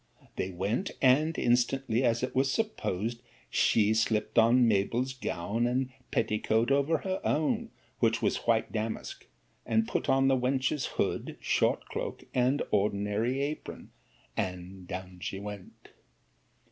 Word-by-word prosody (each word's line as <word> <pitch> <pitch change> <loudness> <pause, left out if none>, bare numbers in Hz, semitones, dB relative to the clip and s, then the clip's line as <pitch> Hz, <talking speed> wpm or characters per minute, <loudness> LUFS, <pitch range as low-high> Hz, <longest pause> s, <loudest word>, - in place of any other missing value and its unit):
'They 95 - -2
went; 100 - -1
and 150 +5 +4
instantly, 120 0 +2
as 115 -1 +2
it 130 - -1
is 135 +1 +2
supposed, 120 - -2 0.3
she 105 -1 +3
slipt 110 -1 0
on 120 +2 +5
Mabell's 115 +5 +1
gown 115 -1 -2
and 130 +1 0 0.2
petticoat 110 +2 +1
over 140 +4 +3
her 190 +2 -3
own, 220 +10 0 0.3
which 115 -1 +2
was - - -1
white 115 -1 +2
damask, 110 0 -4 0.4
and 110 0 +1
put - - -2
on 135 0 +4
the 135 - +4
wench's 130 +2 0
hood, - - -1
short - - +1
cloak, - - -5
and 130 +3 +2
ordinary 105 +5 0
apron, 150 +2 -6 0.4
and 90 0 -4
down 90 0 -7
she 95 - -4
went. 100 -2 -9
120 Hz, 135 wpm, -29 LUFS, 105-135 Hz, 0.4 s, on